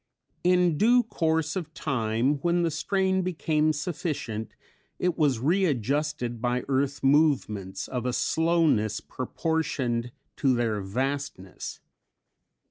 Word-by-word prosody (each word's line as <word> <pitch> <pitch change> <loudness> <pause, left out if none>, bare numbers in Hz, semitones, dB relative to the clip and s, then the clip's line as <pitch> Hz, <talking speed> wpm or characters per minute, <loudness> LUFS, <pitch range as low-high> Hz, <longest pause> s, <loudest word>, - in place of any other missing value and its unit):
In 180 -3 +3
due 245 +3 +5
course 160 -6 0
of 165 -4 -5
time, 125 0 0
when 175 +2 +1
the 165 - +1
strain 190 +4 +1
became 155 -3 +1
sufficient, 145 - -4 0.4
it 180 -2 0
was 145 -6 +2
readjusted 140 - 0
by 125 0 0
earth 140 +1 0
movements 135 -10 +2
of 125 -1 -3
a 125 - -1
slowness 160 -10 +2
proportioned 130 -4 -2 0.3
to 130 -2 +3
their 115 -4 0
vastness. 130 -2 -4
145 Hz, 110 wpm, -27 LUFS, 120-165 Hz, 0.4 s, due